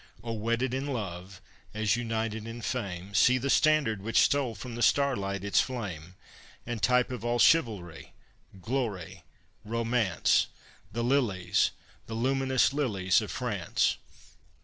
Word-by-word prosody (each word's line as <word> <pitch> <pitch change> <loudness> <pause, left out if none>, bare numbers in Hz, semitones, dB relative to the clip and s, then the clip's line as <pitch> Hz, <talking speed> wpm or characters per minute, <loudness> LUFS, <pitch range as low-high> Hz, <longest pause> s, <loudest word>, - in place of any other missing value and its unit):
Oh! 115 -1 -3
wedded 115 +3 -1
in 135 +2 -2
love, 95 -7 -5 0.3
as 110 0 +1
united 115 -2 -3
in 115 +1 -7
fame, 100 -6 -4
See 120 +6 +5
the 135 +2 -1
standard 150 -10 +3
which 115 +3 -1
stole 135 -5 +3
from 120 +4 -8
the 120 - -5
starlight 100 -7 +1
its 100 - +3
flame, 95 -9 -6 0.5
And 120 -3 -4
type 125 +5 +3
of 125 -2 -5
all 120 0 0
chivalry, 110 - +2 0.5
glory, 95 -6 -4 0.4
romance, 115 - +1 0.4
The 115 - -2
lilies, 120 -8 +2 0.4
the 115 - -5
luminous 130 +2 +2
lilies 100 -11 +1
of - - -6
France. - - -1
115 Hz, 130 wpm, -29 LUFS, 100-125 Hz, 0.5 s, See